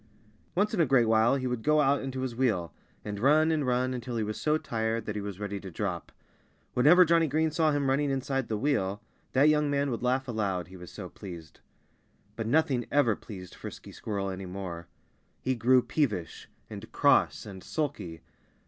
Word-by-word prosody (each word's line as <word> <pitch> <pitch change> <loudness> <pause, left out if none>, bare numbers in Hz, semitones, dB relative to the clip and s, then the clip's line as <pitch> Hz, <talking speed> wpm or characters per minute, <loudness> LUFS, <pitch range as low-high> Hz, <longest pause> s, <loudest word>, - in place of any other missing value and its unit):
Once 205 +4 +1
in 190 - +2
a - - +5
great 125 -2 +4
while 110 +3 +4
he 130 -2 -2
would 125 -2 -2
go 150 +4 +3
out 140 -1 +3
into 130 -1 -4
his 130 -3 -3
wheel, 110 -10 0 0.3
and 105 -1 -4
run 155 +6 +4
and 150 -4 0
run 125 +1 +1
until 125 -1 -5
he 110 - 0
was 105 0 -4
so 155 0 +2
tired 115 -4 -2
that 105 - -3
he 105 - -2
was 100 -1 -6
ready 100 -1 -4
to 95 - -8
drop. 90 -1 -4 0.6
Whenever 160 +9 +6
Johnnie 165 -1 +3
Green 155 +2 +1
saw 160 -1 +2
him 145 -1 0
running 140 +2 +2
inside 135 -1 -1
the 110 - -2
wheel 105 -7 0 0.3
that 135 +3 +5
young 150 -1 +3
man 140 -1 0
would 115 - -3
laugh 130 +1 0
aloud 100 -7 -2
he 95 - -12
was 90 -1 -10
so 95 -4 -7
pleased. 85 -4 -10 0.8
But 115 0 -3
nothing 130 -2 +2
ever 135 -7 +3
pleased 95 -5 -10
Frisky - - -9
Squirrel 100 -2 -3
any 95 0 -6
more. 90 -3 -6 0.5
He 130 - 0
grew 125 +1 +4
peevish 105 - -2 0.2
and - - -9
cross - - +3
and 95 -3 -9
sulky. 95 - -4
125 Hz, 195 wpm, -29 LUFS, 100-140 Hz, 0.8 s, Whenever